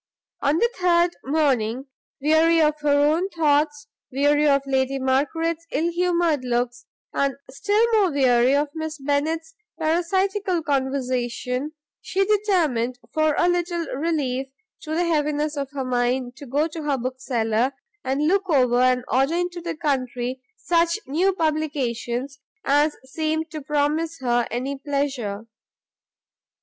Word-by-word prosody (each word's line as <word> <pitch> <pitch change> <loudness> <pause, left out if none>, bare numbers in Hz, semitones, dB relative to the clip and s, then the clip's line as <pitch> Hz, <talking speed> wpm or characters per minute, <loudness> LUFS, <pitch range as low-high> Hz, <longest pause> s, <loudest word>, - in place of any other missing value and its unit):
On 285 +2 +2
the 470 - +3
third 345 -1 +3
morning, 265 -4 +1 0.4
weary 320 +2 +4
of 305 -1 +2
her 295 0 0 0.2
own 350 +5 0
thoughts, 295 -3 +1 0.3
weary 290 +3 +3
of 280 -1 +3
Lady 265 0 0
Margaret's 310 +5 0
ill 330 +4 0
humoured 340 -4 +1
looks, 245 0 -2 0.3
and 275 -2 0 0.2
still 415 - +2
more 410 -4 +4
weary 255 -2 +3
of 290 +1 +1
Miss 315 -1 -5
Bennet's 310 +4 -1 0.2
parasitical 365 +3 0
conversation, 260 -1 -1 0.3
she 390 0 0
determined, 340 - +1 0.2
for 310 -1 +2
a - - +3
little 345 -1 0
relief 270 -4 -1 0.3
to 315 0 -4
the 345 - +2
heaviness 300 -2 0
of 280 -2 -3
her 275 -2 -4
mind, 245 0 0
to 285 - -10
go 290 +5 +1
to 325 0 -7
her 290 -2 0
bookseller, 250 -1 -1 0.3
and 270 +3 0
look 390 +2 +1
over 250 -5 +3
and 250 0 +2
order 270 +5 +2
into 350 0 -2
the 335 -1 -4
country 255 -4 -2 0.2
such 335 +1 +1
new 345 +8 +2
publications 280 -6 -2 0.3
as 295 +2 +3
seemed 315 +3 -2
to 310 -2 -5
promise 300 +3 0
her 240 -2 +1
any 260 +4 -3
pleasure. 270 -8 -2
290 Hz, 135 wpm, -23 LUFS, 260-330 Hz, 0.4 s, weary